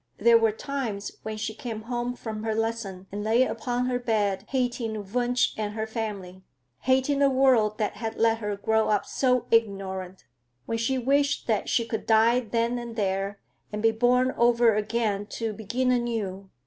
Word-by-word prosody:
There 230 +2 +6
were 225 -1 +3
times 225 -4 -4
when 215 0 -5
she 220 0 -3
came 220 -1 -6
home 240 +1 -3
from 220 -3 -6
her 220 0 -1
lesson 225 -4 -3
and 205 +1 -4
lay 225 +4 +4
upon 245 -1 -2
her 250 -1 0
bed 210 -5 0
hating 245 -4 -1 0.2
Wunsch 245 0 +1
and 210 -1 -3
her 220 0 -2
family, 205 -5 -5 0.4
hating 265 +2 +2
a 280 - +5
world 255 -6 +3
that 215 - -2
had 225 -1 -4
let 225 0 +3
her 210 -2 -2
grow 220 +2 +1
up 210 -2 +1
so 250 -2 +1
ignorant; 195 -4 0 0.4
when 230 +7 -2
she 260 +4 0
wished 280 +3 +1
that 220 -3 0
she 230 - +2
could 225 -1 -4
die 225 +2 +5
then 235 +1 -1
and 235 -1 -7
there, 195 -1 -1 0.3
and 210 +1 -4
be 225 - +5
born 250 +3 +3
over 235 -1 +4
again 210 -1 -1
to 225 -2 -2
begin 235 +5 -1
anew. 220 -6 -2
225 Hz, 175 wpm, -26 LUFS, 210-245 Hz, 0.4 s, There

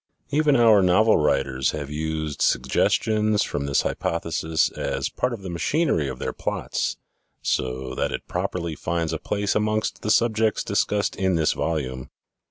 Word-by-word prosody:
Even 150 0 +3
our 115 -4 +6
novel 100 +5 +4
writers 70 -3 +1
have 75 -2 -5
used 80 -1 -3
suggestions 105 - +2
from 70 -1 -3
this 70 - +2
hypothesis 80 -1 -1
as - - -2
part - - -1
of 115 -5 -6
the 95 - -5
machinery 85 - +1
of 65 -1 -5
their - - -3
plots - - -2 0.5
so 65 0 -2
that - - -1
it - - -5
properly 85 -3 -3
finds 85 0 -2
a - - -2
place 100 0 -1
amongst 110 0 -1
the 105 - -3
subjects 110 -1 +2
discussed 105 -1 0
in 95 -2 +1
this 80 -2 +2
volume. 65 -6 -3
85 Hz, 155 wpm, -24 LUFS, 75-105 Hz, 0.5 s, our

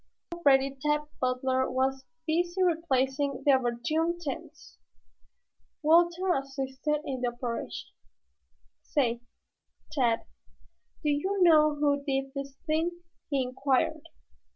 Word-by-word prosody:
Already 275 -5 +3
Tad 300 0 +2 0.2
Butler 260 +1 +1
was 265 +1 0 0.2
busy 345 +3 +1
replacing 280 -5 0
the 285 - +6
overturned 275 +7 +1
tents. 310 +1 -7 1.0
Walter 345 +3 +4
assisted 275 +1 -2
in 260 -2 -3
the 250 - +1
operation. 240 -1 -4 0.9
"Say, 240 -5 0 0.7
Tad, 245 -6 +1 0.8
do 300 - +1
you 375 +8 0
know 305 -3 +6
who 285 -1 +1
did 270 -1 -2
this 275 -1 -6
thing?" 340 +2 -1 0.3
he 275 -3 +1
inquired. 260 +1 0
280 Hz, 105 wpm, -29 LUFS, 265-315 Hz, 1.0 s, the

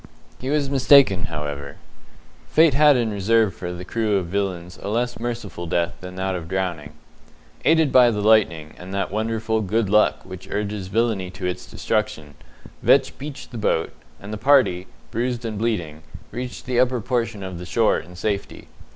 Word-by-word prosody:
He 130 - -4
was 145 -1 +1
mistaken, 135 -8 +5
however. 75 -2 -5 0.7
Fate 160 -2 +5
had 145 0 +6
in 115 -3 0
reserve 105 +1 +2
for 90 -6 -6
the 90 +1 -7
crew 110 0 0
of 95 - -1
villains 90 -1 -3
a - - -4
less 120 +2 -1
merciful 115 -7 -5
death 85 0 0
than 90 0 -8
that 95 0 -2
of 85 -3 -5
drowning. 85 -5 -3 0.7
Aided 160 -3 +4
by 125 -2 +7
the 105 -3 -1
lightning, 100 -8 +3
and 95 +2 -7
that 100 - -1
wonderful 110 +1 -1
"good 105 0 0
luck" 105 0 +3
which 95 +1 -10
urges 105 -2 -3
villainy 105 -2 0
to 95 0 -7
its 90 0 -3
destruction, 105 -9 -2 0.5
Vetch - - +4
beached 145 0 -8
the 120 - -6
boat, 80 -6 0 0.3
and 100 +3 -8
the - - -3
party, 120 -8 +3 0.2
bruised 120 0 -2
and 110 -2 -4
bleeding, 85 -10 -2 0.3
reached 125 0 -6
the 125 -1 0
upper 125 0 +2
portion 115 -3 -2
of 95 -2 -6
the 90 - -7
shore 115 +1 +2
in 90 +3 -13
safety. 100 +2 -3
105 Hz, 175 wpm, -22 LUFS, 90-120 Hz, 0.7 s, by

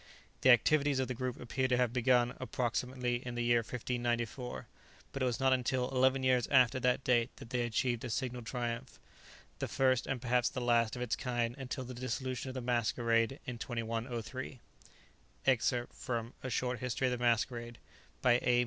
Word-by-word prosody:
The 130 - +5
activities 140 +3 +5
of 130 -1 0
the 130 - -2
group 125 0 -3
appear 130 +2 -1
to 125 -1 +2
have 125 -2 +1
begun, 125 -1 +3
approximately, 125 0 -1
in 120 -1 -5
the 120 - -1
year 120 0 +4
1594, 120 +1 -3 0.5
but 135 - -5
it - - +3
was 120 +1 -1
not 135 -1 +4
until 125 0 0
eleven 130 0 +3
years 125 -2 +3
after 130 -2 +4
that 125 +1 +1
date 120 -1 +3
that 115 - -12
they 125 - +1
achieved 120 0 0
a - - -4
signal 125 +1 -2
triumph, 120 0 -4 0.6
the - - -2
first 130 -1 +2
and 135 -2 -1
perhaps 125 0 +2
the 130 - -4
last 120 -2 +2
of 125 - -3
its 120 - 0
kind 120 -2 -1
until 135 0 -5
the 125 0 -7
dissolution 130 +1 -3
of 130 - -7
the 130 - -3
Masquerade 120 +1 +1
in 125 -2 -5
2103._ 115 +2 -4 0.9
Excerpt 120 -1 +2
from 115 -1 -4
"A 130 - -4
Short 125 0 -1
History 125 +1 -1
of 130 - +2
the 125 0 -2
Masquerade," 120 0 0 0.5
by 120 -1 +5
A. 120 0 +3
125 Hz, 185 wpm, -33 LUFS, 120-130 Hz, 0.9 s, The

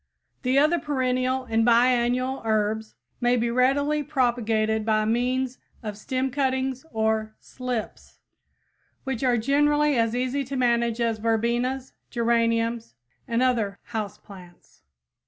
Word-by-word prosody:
The 255 +1 +1
other 305 +4 +4
perennial 255 -2 0
and 225 -2 +1
biennial 245 +2 +2
herbs 220 0 -1 0.2
may 245 0 +2
be 235 0 0
readily 285 +5 +2
propagated 230 -6 0
by 215 -1 +1
means 250 +3 0 0.2
of 210 -2 -4
stem 260 +5 -2
cuttings 265 -1 -1
or 220 -1 0
"slips," 250 -4 -6 0.9
which 265 -2 -3
are 250 -2 +3
generally 295 +4 +2
as 230 0 +1
easy 255 +3 -1
to 275 +2 -5
manage 235 -2 +1
as 230 -2 0
verbenas, 235 +4 -1 0.2
geraniums 230 - 0 0.3
and 235 0 +1
other 225 -6 +1
"house 220 -4 -5
plants." 180 -3 -16
240 Hz, 120 wpm, -25 LUFS, 225-260 Hz, 0.9 s, other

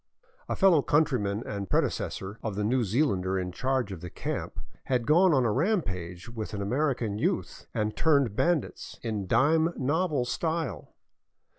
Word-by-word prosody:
A - - 0
fellow 185 -6 +5
countryman 120 -9 +1
and 100 -2 -5
predecessor 100 +3 -1
of 110 -3 -3
the 105 - -1
New 120 +4 +2
Zealander 95 -5 +1
in 90 -1 -2
charge 130 +1 -1
of 90 -4 -7
the 90 - -6
camp - - -4 0.3
had 125 -3 0
gone 175 +6 +5
on 130 -5 +3
a 115 - +2
rampage 100 - -1
with 110 -3 -6
an 100 - -4
American 120 -3 0
youth - - -2
and 105 0 -2
turned 140 -9 +2
bandits, 170 +2 -1
in 105 -5 -3
dime 160 - +3
novel 145 0 0
style. 160 - -3
120 Hz, 155 wpm, -28 LUFS, 100-150 Hz, 0.3 s, fellow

